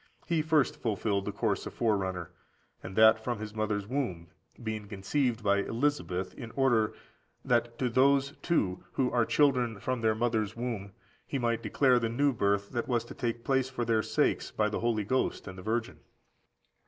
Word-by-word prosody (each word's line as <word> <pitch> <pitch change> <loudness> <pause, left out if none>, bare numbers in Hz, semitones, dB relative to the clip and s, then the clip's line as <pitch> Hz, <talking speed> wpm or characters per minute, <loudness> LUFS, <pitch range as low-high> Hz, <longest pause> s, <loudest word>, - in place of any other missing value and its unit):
He 165 -2 +1
first 155 -3 +2
fulfilled 100 -2 0
the 105 - -2
course 100 -1 -1
of - - -9
forerunner, 95 -6 -1 0.5
and 95 +1 -8
that 110 0 +6
from 120 -1 -2
his 105 0 -7
mother's 105 -2 -1
womb, 100 - -3 0.3
being 110 -2 -4
conceived 115 +4 -1
by 100 0 +3
Elisabeth, 110 -6 -1
in 115 - -8
order 120 -6 +2 0.5
that 120 -1 +1
to 125 - 0
those, 135 +3 +3
too, 95 - 0
who 130 -2 +1
are 120 -1 +2
children 125 -7 +2
from 130 +1 -2
their 110 -1 +2
mother's 110 -2 0
womb 115 -5 -4 0.3
he 140 - -2
might 120 -2 0
declare 130 -3 +3
the 115 -1 -1
new 140 +4 +2
birth 100 -2 0
that 120 -2 -2
was 120 -3 0
to - - -9
take 120 -2 -3
place 130 -1 +1
for 120 -2 -3
their 115 -1 +2
sakes 110 0 0
by 105 0 0
the 105 - -2
Holy 115 -2 0
Ghost 130 +2 -1
and 95 - -7
the 95 - -9
Virgin. 110 +3 -2
115 Hz, 180 wpm, -30 LUFS, 105-125 Hz, 0.5 s, that